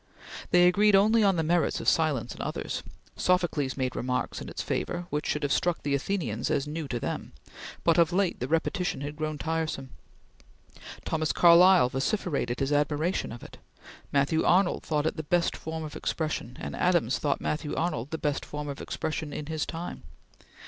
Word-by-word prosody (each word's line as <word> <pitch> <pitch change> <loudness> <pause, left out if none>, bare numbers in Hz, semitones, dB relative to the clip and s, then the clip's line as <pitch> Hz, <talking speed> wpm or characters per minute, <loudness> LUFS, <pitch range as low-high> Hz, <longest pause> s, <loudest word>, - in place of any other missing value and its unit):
They 175 0 +6
agreed 205 +3 +5
only 215 +3 +5
on 195 -2 +4
the 165 - 0
merits 170 +1 +1
of - - -6
silence 155 -7 +2
in - - -8
others. - - -3 0.3
Socrates 175 -7 +1
made 130 -1 -1
remarks 125 0 -2
in - - -7
its - - -5
favor, 175 - -2
which 150 0 -2
should 150 - -1
have 145 - 0
struck 175 +2 +1
the 145 - 0
Athenians 140 - -1
as 140 - +1
new 155 0 -4
to 120 -3 -3
them; - - -4 0.5
but 165 0 +4
of 165 -1 +4
late 185 0 +1
the 125 - -2
repetition 165 0 -1
had 145 +1 -5
grown 155 0 -3
tiresome. 155 -4 -3 1.1
Thomas 155 -1 0
Carlyle 175 -4 +6
vociferated 140 - -1
his 135 +2 +1
admiration 150 +4 0
of 115 - -9
it. - - -12 0.5
Matthew 145 +3 +2
Arnold 185 0 +3
thought 150 -2 -1
it 160 - -1
the - - -1
best 170 +3 +1
form 160 0 -5
of 150 - -7
expression; 155 -6 -3
and - - -5
Adams 175 -9 +2
thought 145 -2 0
Matthew 150 -1 -2
Arnold 145 -7 -2
the 160 - -3
best 150 -2 -1
form 150 0 -6
of 140 - -6
expression 155 -1 -4
in 150 - -5
his 155 0 -3
time. 170 +1 -6
155 Hz, 185 wpm, -28 LUFS, 145-175 Hz, 1.1 s, They